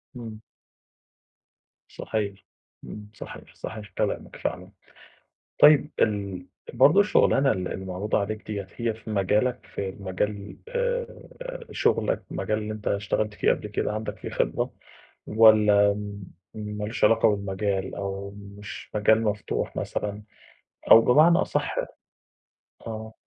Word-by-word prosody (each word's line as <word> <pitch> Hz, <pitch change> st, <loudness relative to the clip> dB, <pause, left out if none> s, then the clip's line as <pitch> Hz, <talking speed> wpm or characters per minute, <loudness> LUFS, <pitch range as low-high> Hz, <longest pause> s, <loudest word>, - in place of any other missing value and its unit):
إمم. 110 Hz, -3 st, -8 dB, 1.5 s
صحيح 100 Hz, -3 st, -4 dB, 0.4 s
إمم 105 Hz, -1 st, -9 dB
صحيح، -, -, -11 dB
صحيح 105 Hz, -1 st, -7 dB
كلامك -, -, -2 dB
فعلًا. -, -, -4 dB, 0.9 s
طيّب 150 Hz, 0 st, +7 dB
ال 100 Hz, -4 st, 0 dB, 0.3 s
برضه 145 Hz, +10 st, +6 dB
الشغلانة 140 Hz, -9 st, +4 dB
ال 90 Hz, -1 st, -2 dB
اللي 95 Hz, -, -6 dB
معروضة 95 Hz, +3 st, -1 dB
عليك 110 Hz, +2 st, -4 dB
دِيَّة 100 Hz, -3 st, -4 dB
هي 115 Hz, -2 st, -1 dB
في 110 Hz, 0 st, -12 dB
مجالك؟ 105 Hz, +5 st, +1 dB
في 95 Hz, -, -4 dB
المجال 100 Hz, +2 st, -4 dB
آآ -, -, -1 dB, 0.6 s
شُغلك -, -, +1 dB
مجال 105 Hz, -, -1 dB
اللي 110 Hz, 0 st, -4 dB
أنت 105 Hz, -1 st, -7 dB
اشتغلت 105 Hz, +1 st, 0 dB
فيه -, -, +2 dB
قبل -, -, -3 dB
كده، -, -, -2 dB
عَندك 110 Hz, +1 st, -4 dB
فيه -, -, -6 dB
خبرة؟ -, -, -1 dB, 0.5 s
والّا 105 Hz, -2 st, +6 dB
م 100 Hz, -1 st, -7 dB, 0.3 s
ما 105 Hz, -1 st, -4 dB
لوش 110 Hz, +3 st, -4 dB
علاقة 115 Hz, +1 st, +5 dB
بالمجال؟ 95 Hz, -1 st, -2 dB
أو 100 Hz, 0 st, -4 dB
مش 100 Hz, 0 st, -10 dB
مجال 110 Hz, +1 st, +4 dB
مفتوح 105 Hz, -1 st, -2 dB
مثلًا؟ 105 Hz, 0 st, -3 dB, 0.7 s
أو 115 Hz, -, +11 dB
بمعنى 155 Hz, +8 st, +6 dB
أصح -, -, -1 dB, 1.1 s
آه. 110 Hz, 0 st, -6 dB
105 Hz, 125 wpm, -26 LUFS, 100-110 Hz, 1.5 s, أو